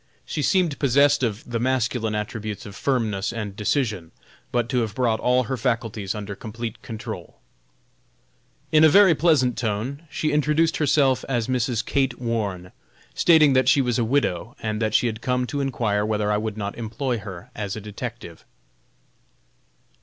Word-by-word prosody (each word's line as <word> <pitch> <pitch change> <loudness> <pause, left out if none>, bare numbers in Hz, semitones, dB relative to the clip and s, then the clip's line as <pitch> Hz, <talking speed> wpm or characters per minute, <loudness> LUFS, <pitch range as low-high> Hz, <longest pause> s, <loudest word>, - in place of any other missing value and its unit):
She 150 - -3
seemed 175 -2 +1
possessed 140 +1 +4
of 115 -3 -1
the 120 -1 -2
masculine 120 -3 0
attributes 105 -1 -4
of 100 - -9
firmness 110 -8 -1
and 105 -4 -5
decision, 105 - -1 0.4
but 120 -2 0
to 125 - +1
have 110 -3 -2
brought 115 -3 +1
all 125 +1 +2
her 130 +3 -3
faculties 115 -5 -2
under 105 -1 -5
complete 115 +2 -7
control. 110 -2 -7 1.3
In 155 0 +5
a 160 - +8
very 195 +2 +7
pleasant 140 -8 +2
tone 120 +8 -3
she 155 +1 -1
introduced 150 +2 +2
herself 140 -3 +2
as 120 -4 0
Mrs. 125 -3 0
Kate 135 -3 0
Warne, 105 -7 -3 0.4
stating 155 -5 +5
that 130 0 +4
she - - +5
was 125 -2 +1
a - - +2
widow, 115 -4 0
and 110 -1 -3
that 110 -1 0
she - - +4
had 110 -1 -2
come 125 0 0
to 140 +3 -3
inquire 110 -6 0
whether 105 -1 0
I 105 - +2
would 110 0 -3
not 100 +2 -4
employ 120 +2 -2
her 100 +3 -9
as 100 -2 -4
a - - -5
detective. 105 -1 -8
120 Hz, 165 wpm, -23 LUFS, 105-135 Hz, 1.3 s, a